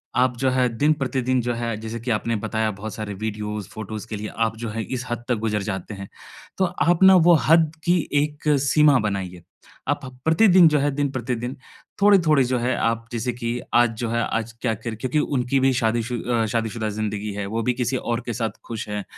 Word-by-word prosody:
आप 125 -1 +2
जो 130 +1 +1
है, 130 -1 +2
दिन-प्रतिदिन 130 -3 +1
जो 120 +1 -1
है, 115 -1 -2
जैसे 115 +1 -5
कि 120 0 -2
आपने 115 +2 0
बताया, 110 -1 0
बहुत 105 +2 -7
सारे 105 -2 -5
वीडियोज़, 105 -1 -4
फ़ोटोज़ 110 0 -7
के 110 - -4
लिए 105 +1 -5 0.2
आप 110 0 -3
जो 115 0 -5
है, 110 +1 -3
इस 130 +1 -4
हद 120 0 -3
तक 125 - +3
गुज़र 105 -2 0
जाते 95 +1 -4
हैं, 95 0 -8 0.5
तो 190 - +4
आप 175 0 +1
ना, 190 0 +9
वो 175 -1 +6 0.2
हद 160 -2 +5
की 175 0 +3 0.2
एक 150 0 -3 0.2
सीमा 145 -1 +5
बनाइए। 95 -4 -3 0.5
आप - - -1 0.2
प्रतिदिन 175 +2 +6
जो 150 -1 +2
है, 145 +1 +1
दिन-प्रतिदिन, 130 -3 -2 0.5
थोड़े-थोड़े 170 -9 +5
जो 125 +1 0
है 125 +2 0
आप 115 0 0
जैसे 120 +1 -2
कि 120 0 -3 0.2
आज 120 -1 +5
जो 120 - -2
है, 115 +1 0
आज 115 0 -2
क्या 115 -3 +1
कर 110 +1 -6
क्योंकि 130 +6 -1
उनकी 135 -2 0
भी 135 - +4
शादीशु 120 +1 0
अ, 120 -2 +1
शादीशुदा 110 0 -2
ज़िंदगी 105 0 -3
है, 100 0 -4
वो 115 +2 -2
भी 125 +2 +1
किसी 125 +1 -1
और 120 0 -2
के 120 - -2
साथ 115 -1 -2
खुश 115 -2 -5
हैं, 105 -1 -3
120 Hz, 210 wpm, -23 LUFS, 110-135 Hz, 0.5 s, ना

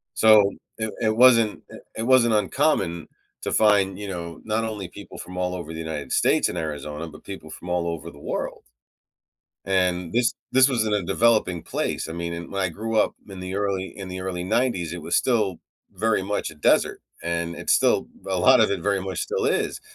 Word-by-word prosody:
So, 110 -2 +6 0.3
it 110 -1 -3
it 110 -1 +2
wasn't, 115 -3 +5
eh - - -9 0.2
it 110 - -2
wasn't 120 -2 +4
uncommon 95 - +1 0.3
to - - -3
find, 100 -3 +3
you 105 - -5
know, 85 -3 -6
not 110 +1 -1
only 105 -4 -4
people 100 +2 -11
from 90 +1 -8
all 90 0 -1
over 85 -3 -6
the 80 - -6
United 80 -3 -5
States - - +3
and 90 - -5
Arizona, 75 0 -4
but 80 - -13
people 95 -5 -9
from 90 +3 -9
all 90 -1 0
over 85 0 -5
the 70 - -15
world. - - -4 1.0
And 90 -3 0
this 120 0 +2 0.2
this 130 +1 +6
was 120 -5 +1
in 105 - 0
a 105 -1 +1
developing 95 -2 +2
place, - - -3
I - - -5
mean, 85 0 -4
i 85 - -4
when 95 +3 -5
I 95 - +1
grew 110 +6 -4
up - - +2
in 95 -2 -8
the 90 +1 -5
early 100 -2 -1
in 95 -2 -7
the 90 0 -5
early 90 -1 -3
90s, 100 -5 0
it 85 -2 -6
was 85 +2 0
still 105 -8 +1 0.4
very 105 0 +1
much 105 +2 -2
a 80 - -13
desert, 75 - +2 0.2
and 85 0 -2
it's - - 0
still - - +3 0.2
a - - 0
lot - - +6
of - - +4
it 100 - -1
very 100 -1 0
much 95 -2 -4
still - - -2
is, - - 0
95 Hz, 210 wpm, -24 LUFS, 85-110 Hz, 1.0 s, So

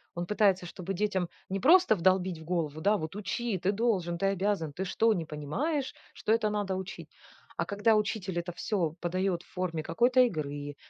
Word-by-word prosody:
Он 175 0 -2
пытается, 195 -2 +2
чтобы 180 +2 -5
детям 190 -2 0 0.2
не 195 +1 -1
просто 350 - +6
вдолбить 185 -1 +2
в 160 - -11
голову: 160 -3 -2
"Да, 205 +6 +3
вот 160 +2 -4
учи! 215 +1 -2
Ты 185 +4 0
должен! 195 -6 0
Ты 195 - +1
обязан! 195 -5 0
Ты 190 +6 -4
что, 225 +4 +2
не 170 -5 -2
понимаешь, 250 - -2 0.2
что 215 - -2
это 220 -1 +3
надо 205 -2 -1
учить?" 190 0 -7 0.5
А - - 0
когда 210 +2 +2
учитель 205 -4 -1
это 170 +1 -4
всё 175 -3 -1
подает 180 0 -1
в - - -24
форме 180 -3 -2
какой-то 245 +11 +2
игры, 145 - -1
190 Hz, 185 wpm, -29 LUFS, 170-210 Hz, 0.5 s, просто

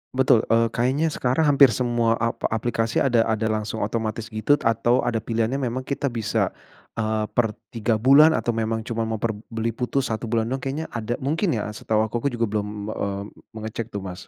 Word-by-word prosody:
Betul, 130 -3 +4
eee, 115 0 +3
kayaknya 130 +7 +1
sekarang 150 0 +1
hampir 140 -3 +7
semua 120 -2 +1
ap 115 0 -2
aplikasi 115 0 0
ada 120 -4 +3
ada 110 0 0
langsung 110 0 -2
otomatis 110 +1 -2
gitu, 110 +7 +1
atau 115 +2 +2
ada 115 -3 -1
pilihannya 115 +2 0
memang 130 -1 -3
kita 140 -1 -1
bisa, 110 -3 0 0.5
eee, 110 -1 0
per 115 -3 +1 0.2
3 115 0 0
bulan 140 +8 +6
atau 120 - 0
memang 110 0 -2
cuma 115 0 -2
mau 110 - -2
per 110 +1 -1 0.2
beli 115 0 -2
putus 125 +1 -2
1 110 +1 -3
bulan 115 +1 0
doang 135 - -1
kayaknya 135 +5 -4
ada 115 +1 -3
mungkin 160 - 0
ya 105 -1 -3
setahu 110 +1 0
aku 115 +4 -2
juga 120 -4 -1
belum, 105 -1 -3
eee, 100 -2 -3 0.3
mengecek 110 +1 -5
tuh, 100 -4 -6
Mas. 90 -2 -8
115 Hz, 190 wpm, -24 LUFS, 110-125 Hz, 0.5 s, hampir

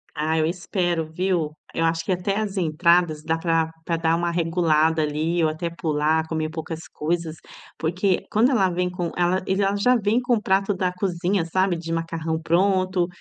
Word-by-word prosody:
Ah, 155 +1 0
eu 155 - +2
espero 175 -2 -1
viu, 170 -1 -1 0.2
a - - -10
eu 165 - +2
acho 165 0 0
que 195 - -2
até 185 +2 0
as 205 -2 -2
entradas 170 -1 +2
dá 160 0 0
pra 165 -1 0
pra 165 -1 0
dar 165 0 +2
uma 170 0 -1
regulada 165 -2 +2
ali, 160 +3 0
ou 155 - +3
até 170 +2 -3
pular, 160 -1 0
comer 160 -1 -2
poucas 160 0 -6
coisas, 165 0 -3 0.4
porque 180 +3 0
quando 230 +5 +4
ela 195 -7 +3
vem 180 +1 -1
com 175 -2 -3
ela 180 +1 +1
ele 190 +1 +1
a 195 +1 +1
já 250 +5 +3
vem 220 +2 +2
com 245 0 +1
o 210 - -2
prato 195 0 +1
da 185 -1 -1
cozinha, 180 -1 -1
sabe, 185 +2 +1
de 165 0 -6
macarrão 165 -1 -2
pronto, 185 +1 +2
170 Hz, 195 wpm, -23 LUFS, 160-185 Hz, 0.4 s, quando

